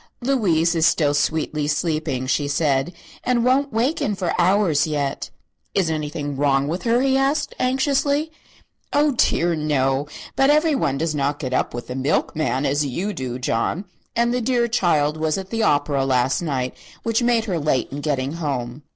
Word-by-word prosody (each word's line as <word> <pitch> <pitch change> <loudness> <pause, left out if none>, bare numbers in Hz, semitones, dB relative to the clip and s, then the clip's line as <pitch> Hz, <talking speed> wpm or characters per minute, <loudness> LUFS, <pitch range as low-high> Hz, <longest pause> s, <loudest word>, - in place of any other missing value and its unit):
"Louise 185 -11 +2
is 165 -1 +3
still 145 -3 +2
sweetly 150 0 0
sleeping," 155 -4 -1
she 145 +2 0
said, 140 0 +1 0.3
"and 245 -1 +1
won't 275 +2 +2
waken 230 -2 0
for 185 -3 -2
hours 175 -5 +3
yet." 145 -3 -2 0.5
"Is 180 -5 +2
anything 150 -2 -3
wrong 140 0 +2
with 170 +5 -2
her?" 235 +1 +3
he 270 -1 +2
asked, 275 +3 +1
anxiously. 280 +4 +1 0.6
"Oh, 295 +1 +3
dear, 175 -8 +2
no! 140 -2 0 0.3
but 270 +1 +3
everyone 295 - +2
does 160 +2 -1
not 145 0 -1
get 130 -3 -4
up 130 - 0
with 120 - -5
the - - -6
milkman, 135 0 0
as 145 +2 +1
you 175 +10 -3
do, 125 -5 -4
John; 125 - -1 0.3
and 235 +1 +2
the 250 - 0
dear 240 0 +1
child 155 -9 +1
was 155 +1 0
at 190 0 -7
the 225 0 -1
opera 145 -7 +2
last 130 +1 +1
night, 130 -6 -2 0.3
which 230 +1 +1
made 240 -2 +2
her 185 -6 -1
late 145 -4 0
in 140 +1 -5
getting 140 -3 -1
home." 140 -5 -4
155 Hz, 170 wpm, -22 LUFS, 140-230 Hz, 0.6 s, is